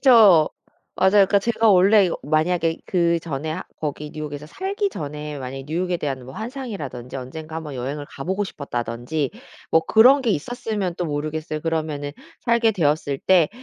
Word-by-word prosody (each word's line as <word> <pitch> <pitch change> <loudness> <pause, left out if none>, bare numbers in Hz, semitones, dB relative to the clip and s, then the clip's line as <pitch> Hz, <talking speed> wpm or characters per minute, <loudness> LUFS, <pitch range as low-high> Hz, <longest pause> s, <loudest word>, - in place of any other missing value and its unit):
그쵸. 210 - +7 0.5
맞아요. 190 - +5 0.2
그러니까 200 +1 +4
제가 225 +2 +2
원래 200 +2 +6
이거 170 - -2
만약에 165 +2 +1
그전에 170 -4 0
하 175 +4 -3 0.2
거기 150 0 -4
뉴욕에서 150 -1 -6
살기 390 - -2
전에 150 - -6
만약에 135 +1 -6
뉴욕에 175 +3 -1
대한 135 -4 -3
뭐 130 +2 -10
환상이라든지 205 - -6
'언젠가 155 +5 -7
1 160 - -5
번 150 -2 -7
여행을 140 +3 -4
가보고 190 +9 -2
싶었다.'든지 125 - -3 0.4
뭐 160 - +4
그런 255 +6 +6
게 235 - +1
있었으면 205 - -2
또 180 - -2
모르겠어요. 155 +1 -3
그러면은 155 -3 -2 0.3
살게 235 -1 +3
되었을 150 -5 0
때 175 -2 +4
160 Hz, 380 characters per minute, -23 LUFS, 145-195 Hz, 0.5 s, 그쵸